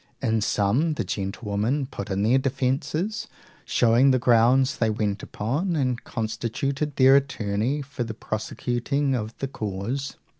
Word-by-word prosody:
In 110 -4 +1
sum, 115 +11 +1
the - - -1
gentlewomen 105 +7 -2
put 100 -6 -7
in 100 0 0
their 120 +5 +4
defences, 135 - -1 0.4
showing 120 +3 +4
the 130 - +4
grounds 125 +2 +4
they 115 - +2
went 105 -2 -1
upon, 150 - -2
and 130 -5 0
constituted 130 +6 -3
their 135 0 +6
attorney 130 0 0
for 140 -2 -4
the 110 -2 -6
prosecuting 125 +6 -2
of 110 -2 -3
the 135 - -3
cause. 115 +4 -4
125 Hz, 140 wpm, -25 LUFS, 110-140 Hz, 0.4 s, their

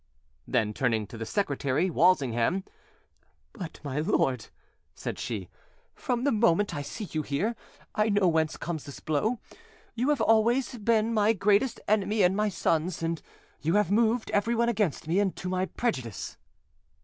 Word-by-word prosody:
Then, 110 -4 +1
turning 115 -3 0
to 100 - -11
the 115 0 -5
secretary, 150 -2 0
Walsingham— 145 0 +2 0.9
"But, 180 -8 -8
my 140 0 -2
lord," 135 - +1 0.5
said - - -5
she, - - -4 0.5
"from 245 -3 -2
the 285 - +3
moment 205 -3 +2
I 145 - -2
see 145 +10 -6
you 155 - -1
here, 190 +12 -1 0.4
I 215 +1 +2
know 205 -2 +3
whence 160 -2 +1
comes 165 -4 -4
this 140 - -9
blow: 210 +11 0 0.6
you 245 +5 0
have 295 -3 +2
always 230 +4 +3
been 225 +1 +2
my 215 0 +4
greatest 210 +4 +2
enemy 210 0 +2
and 180 +1 +4
my 210 +1 +1
son's, 165 -2 0
and 165 -1 -1 0.4
you 165 +5 +1
have 210 -3 +2
moved 225 +2 +2
everyone 235 +3 +2
against 200 - -1
me 175 +5 +2
and 200 -2 +1
to 180 - -5
my 185 0 0
prejudice." 130 - -3
190 Hz, 160 wpm, -28 LUFS, 155-220 Hz, 0.9 s, my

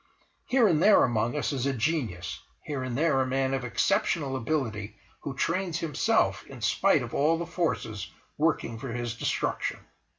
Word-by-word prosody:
Here 250 -3 +4
and 165 -5 +2
there 210 +2 +7
among 120 +3 0
us 150 - -1
is 135 -1 -1
a 140 - +1
genius, 120 - -2 0.2
here 145 -3 -4
and 130 -1 -3
there 150 -3 +3
a 130 - 0
man 135 +1 0
of 135 -1 -1
exceptional 135 - +1
stability 115 -6 -2 0.2
who 140 - -6
trains 170 +3 0
himself 165 -4 +1
in - - -11
spite - - +3
of - - -7
all 155 +4 +3
the 170 - -3
forces 135 - -2 0.3
working 145 -7 0
for 135 - -6
his 120 -1 -3
destruction. 115 - -1
135 Hz, 170 wpm, -28 LUFS, 120-160 Hz, 0.3 s, there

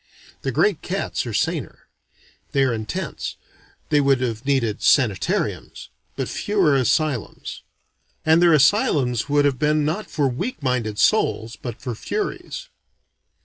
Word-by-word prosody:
The - - -2
great - - +2
cats - - -3
are - - -3
saner. - - -2 0.7
They 140 - +3
are 130 -3 +2
intense, 110 -2 -4 0.5
they 145 - +4
would 135 -2 +3
have 120 0 -3
needed 120 -7 +1
sanitariums: 110 -9 +1 0.3
but - - -2
fewer 190 -9 +1
asylums. 135 0 -1 0.6
And 160 +2 +5
their 175 -1 +6
asylums 140 - +3
would 145 0 +3
have 135 -3 +1
been 150 0 +2
not 170 +8 -2
for 145 -3 +1
weak 140 - -4
minded 120 -5 -1
souls, 110 +2 +2
but 120 -3 -7
for 125 - -4
furies. 430 - -4
135 Hz, 135 wpm, -22 LUFS, 120-155 Hz, 0.7 s, their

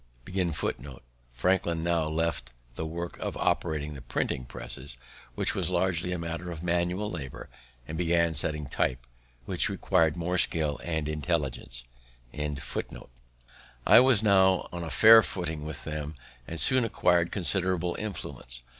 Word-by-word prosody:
Franklin 85 +4 +1
now 85 -2 +1
left 80 -6 -1 0.2
the 80 +6 -4
work 85 +2 -5
of - - -3
operating 75 -2 0
the 70 - -9
printing - - -2
presses, 65 +1 -7 0.4
which - - 0
was - - -1
largely 90 -1 0
a 90 - -1
matter 85 +1 -4
of 85 -1 -6
manual 90 +4 0
labor, 70 -7 -7 0.4
and 80 +1 -5
began 85 -1 +2
setting 75 0 -2
type, 65 -2 -1 0.4
which - - +2
required 80 -2 +2
more 90 +1 0
skill 75 -4 +1
and 80 -3 -2
intelligence. 75 -6 -2 2.0
I - - +9
was 125 -4 +5
now 95 -3 +4
on 85 -1 -5
a 80 - -5
fair 110 +4 +8
footing 80 -7 -4
with 80 - -6
them, 75 0 -5 0.3
and 80 - -3
soon 130 +4 +5
acquir'd 90 -6 +2
considerable 90 -2 0
influence. 65 - -6
85 Hz, 135 wpm, -28 LUFS, 75-90 Hz, 2.0 s, I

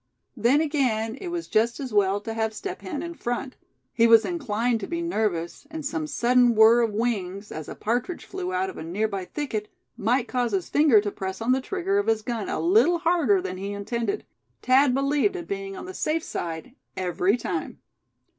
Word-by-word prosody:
Then 250 +6 +3
again, 250 -8 0
it 375 - -5
was 345 -1 -4
just 230 +3 +1
as 260 -5 -5
well 200 -1 +3
to 225 +1 -5
have 220 -1 -1
Step - - -6
Hen 240 - -4
in 340 0 -5
front. 255 -3 -4 0.4
He 230 - +4
was 230 -1 +7
inclined 245 -8 -1
to - - -5
be 340 0 -3
nervous; 215 - -2
and 315 -2 -6
some 310 +1 -2
sudden 245 -3 +3
whirr 225 +2 +7
of 230 -2 +1
wings, 205 -3 -2
as 155 -1 -6
a - - -6
partridge 245 - -2
flew 370 -1 -4
out 370 +1 0
of - - -10
a - - -5
nearby 195 +3 -2
thicket, 220 -5 -4 0.3
might 245 +3 +1
cause 245 -3 -1
his 190 -3 -1
finger 285 -8 +5
to 205 -1 -3
press 190 -1 -5
on 225 +2 0
the 260 +1 +2
trigger 385 +6 -1
of 405 - -2
his 220 -1 +1
gun 230 -3 -3
a - - -2
little 350 -1 +4
harder 325 - +2
than 185 -1 -4
he 200 +2 -4
intended. 235 - -3 0.4
Thad 260 0 +4
believed 290 +8 +1
in 345 -2 -5
being 195 -1 -5
on - - -7
the 375 - -7
safe 320 -2 -1
side, 165 +8 -5 0.2
every 185 +3 +1
time. - - -4
235 Hz, 200 wpm, -25 LUFS, 205-300 Hz, 0.4 s, was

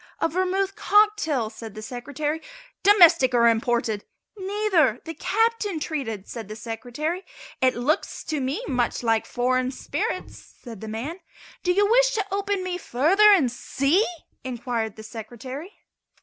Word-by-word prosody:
"A - - +2
vermouth 375 +3 0
cocktail," 410 - +2
said 225 -3 -9
the 215 - -7
Secretary. 285 +6 -4 0.4
"Domestic 340 -10 +6
or 235 -1 +5
imported?" 230 -2 +1 0.3
"Neither; 385 - +1
the 325 - -5
Captain 435 -2 0
treated," 260 - -4
said 230 -4 -7
the 215 - -7
Secretary. 245 - -4 0.4
"It 255 0 +3
looks 260 +6 -1
to 310 -2 -2
me 275 - -2
much 245 -1 -1
like 225 -1 +1
foreign 255 +1 +1
spirits," 260 - -5
said 230 -6 -10
the 220 - -6
man. 250 - -5 0.4
"Do 360 - +1
you 405 +3 +3
wish - - +4
to 410 -3 0
open 400 -1 -1
me 360 -1 -3
further 365 - +4
and 305 -12 +4
see?" 275 - +1 0.4
inquired 235 -4 -3
the 220 - -10
Secretary. 245 - -8
280 Hz, 145 wpm, -24 LUFS, 235-375 Hz, 0.4 s, Domestic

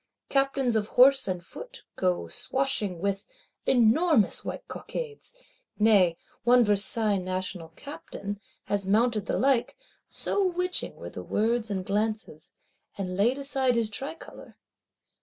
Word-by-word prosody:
Captains 275 -3 +1
of 210 -1 +1
horse 265 0 +7
and 180 -2 -3
foot - - -11
go 180 - 0
swashing 215 - -1
with 200 0 -2 0.4
"enormous 255 - +3
white - - -6
cockades;" 470 0 -7 0.4
nay 200 -6 +4 0.3
one 245 +1 +6
Versailles 210 0 +2
National 185 -2 -4
Captain 210 -9 -7 0.2
had 200 -2 -1
mounted 220 +1 +2
the - - 0
like, 265 -2 +1 0.3
so 405 - -1
witching 360 0 -1
were - - -9
the - - -7
words 225 +1 0
and 190 -2 -3
glances; 210 -6 -3 0.5
and 185 -2 -3
laid 230 +7 +2
aside 270 -3 0
his 225 -2 0
tricolor! 275 +9 -7
220 Hz, 125 wpm, -27 LUFS, 200-270 Hz, 0.5 s, horse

